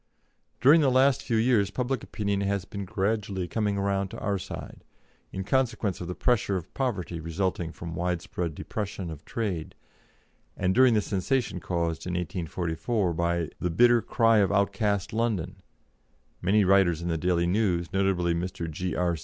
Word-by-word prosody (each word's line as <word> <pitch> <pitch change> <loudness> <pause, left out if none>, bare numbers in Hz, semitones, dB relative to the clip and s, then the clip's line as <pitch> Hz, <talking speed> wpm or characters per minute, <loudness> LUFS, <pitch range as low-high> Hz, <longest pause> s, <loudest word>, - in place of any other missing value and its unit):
During 150 +6 +7
the 140 - +4
last 130 +1 +4
few 115 -2 0
years 110 -4 +3
public 125 +3 -2
opinion 100 -1 -2
has 100 -1 -1
been 100 0 -6
gradually 100 -1 -1
coming 105 0 -1
round 100 0 0
to - - -8
our 100 -1 -1
side, - - -8 0.5
in 95 - -4
consequence 120 -5 0
of 90 - -5
the 90 - -4
pressure 110 -6 +1
of 85 - -8
poverty 95 - -2
resulting 85 +1 -2
from 85 0 -7
widespread 85 -1 -2
depression 100 -5 -5
of 80 -1 -9
trade, 100 -9 -3 0.8
and 95 0 +1
during 130 -1 +5
the 105 - +3
sensation 105 +1 -1
caused 85 -2 -2
in 90 - -2
1884 90 +3 -2
by 85 -1 0
"The 90 - -1
Bitter 120 +7 +5
Cry 115 0 +3
of 100 -1 +3
Outcast 100 0 0
London," 110 -7 -1 0.8
many 100 +3 +3
writers 90 -4 +3
in - - -3
the 85 - 0
Daily 85 0 +1
News 90 -3 0
notably 95 -3 +1
Mr. 85 0 -3
G.R. 90 +1 -1
95 Hz, 160 wpm, -27 LUFS, 85-110 Hz, 0.8 s, During